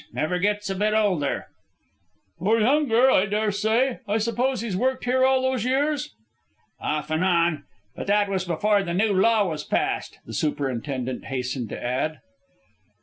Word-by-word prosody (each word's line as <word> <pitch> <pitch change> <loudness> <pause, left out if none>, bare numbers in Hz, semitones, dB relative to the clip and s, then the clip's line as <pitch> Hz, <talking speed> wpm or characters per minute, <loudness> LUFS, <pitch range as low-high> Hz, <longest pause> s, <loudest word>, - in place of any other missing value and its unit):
Never 180 +3 -1
gets 205 +2 0
a 195 - -1
bit 210 +3 0
older." 185 -10 0 0.9
"Or 220 +6 +2
younger, 260 0 +4
I 195 -3 +3
dare 210 +1 0
say. 225 +6 +1
I 205 +2 +1
suppose 240 +2 0
he's 225 -5 -3
worked 255 +6 0
here 260 +1 +2
all 260 0 +3
those 260 -3 0
years?" 275 - 0 0.6
"Off 150 +1 -3
and 155 +3 +1
on 170 -5 +2 0.3
but - - -6
that 205 0 +3
was 190 -2 -1
before 200 +4 +1
the 175 -3 -3
new 205 +2 +2
law 210 +1 +3
was 155 -3 -4
passed," - - -2
the - - -9
superintendent 130 -3 -2
hastened 125 -3 -3
to - - -6
add. 130 +6 -2
205 Hz, 160 wpm, -24 LUFS, 155-230 Hz, 0.9 s, younger